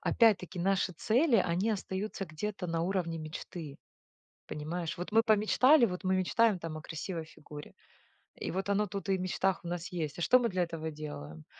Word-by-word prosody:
опять 225 -4 +4
таки 180 0 -9
наши 190 +1 +1
цели 235 - +3
они 185 +4 +1
остаются 195 0 -3
где-то 180 +4 -4
на 165 -1 -1
уровне 175 -3 -1
мечты. 155 -1 -7 0.7
Понимаешь! 165 +3 -4
Вот 180 +4 -5
мы 225 +1 +5
помечтали 235 +6 +5
вот 180 0 -4
мы 190 0 +2
мечтаем 200 +2 +3
там 165 -1 -5
о - - -8
красивой 165 +1 -5
фигуре, 150 -1 -11 0.6
и - - -4
вот 190 +3 -2
оно 205 +1 +2
тут 195 +1 -5
и 190 - +3
в 185 - -4
мечтах 185 0 0
у - - -7
нас 175 0 -3
есть. 160 -5 -3
А - - -3
что 250 +10 +6
мы 235 -2 +1
для 185 -1 +1
этого 165 -2 -4
делаем? 80 - -8
180 Hz, 190 wpm, -31 LUFS, 165-200 Hz, 0.7 s, что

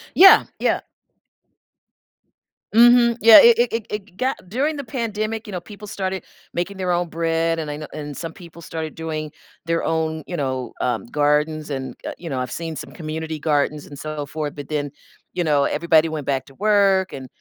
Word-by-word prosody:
Yeah, 385 +1 +9 0.2
yeah. - - +1 1.9
Mhm. 235 0 +6
Yeah, 225 0 +10
it 235 -1 +7
it 240 -1 +2
it 230 -2 -2
it 200 -3 -7
got 260 +1 0
during 290 +7 0
the 280 - -4
pandemic, 225 -2 -3
you 210 - -8
know, 180 -2 -4
people 210 +2 -11
started 190 -1 -3 0.3
making 185 +3 -2
their 185 -1 -1
own 175 0 +1
bread 165 0 0
and 155 -2 -4
I 145 - -4
know 150 - -7
and 150 -2 -6
some 165 -1 -5
people 170 -2 -13
started 160 -2 -5
doing 155 -2 -4 0.4
their 165 0 0
own, 160 -1 -1
you 175 - -5
know, 130 -5 -3
um, 120 -3 -1
gardens 150 +3 0
and, 135 -2 -4
uh, - - -4
you 165 -4 -7
know, 130 - -2
I've 125 - -3
seen 165 -1 -4
some - - -8
community 160 0 -5
gardens 150 -1 0
and 145 - -11
so 155 -1 -4
forth, 150 0 -5
but 145 0 -8
then, 145 -1 -2 0.4
you 175 - -1
know, 145 -3 +2
everybody 160 +1 +3
went 155 -3 -5
back 135 -2 -1
to 135 - -17
work, 200 -2 +3
and, 130 -1 -7
165 Hz, 195 wpm, -22 LUFS, 150-200 Hz, 1.9 s, Yeah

